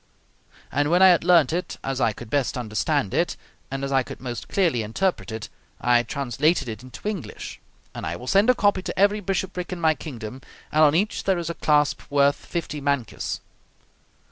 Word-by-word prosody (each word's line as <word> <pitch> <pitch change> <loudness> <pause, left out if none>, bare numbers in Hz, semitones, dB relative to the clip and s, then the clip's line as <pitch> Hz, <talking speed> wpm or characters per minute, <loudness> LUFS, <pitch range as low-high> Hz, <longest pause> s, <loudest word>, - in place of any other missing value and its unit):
And 145 +1 +1
when 175 +3 +5
I 190 - +9
had 175 -2 +4
learnt 170 -5 +5
it 180 +2 -3
as 135 -1 -2
I 115 - +3
could 110 +2 -11
best 140 -3 0
understand 110 -4 -1
it, - - 0 0.3
and 135 0 -4
as 140 - -2
I 135 -1 +4
could - - -8
most 120 -2 -6
clearly 170 - +1
interpret 120 - -1
it, 110 -1 -5 0.3
I 120 -1 +4
translated 140 +4 0
it 110 -2 -6
into 130 - -9
English; 180 - -5 0.3
and - - -7
I 85 - -2
will 125 - -9
send 200 - +4
a 255 - +6
copy 205 -4 +2
to - - -5
every 205 +2 +4
bishopric 190 -2 -3
in 180 - -4
my 160 -1 +4
kingdom; 130 -5 -8 0.3
and 155 +1 +4
on 150 0 +5
each 200 +5 0
there 190 -2 +2
is 170 -1 -3
a - - -4
clasp 150 -2 +2
worth 140 0 +3
fifty 160 -4 -4
mancus. 140 -6 -2
145 Hz, 195 wpm, -24 LUFS, 125-180 Hz, 0.3 s, I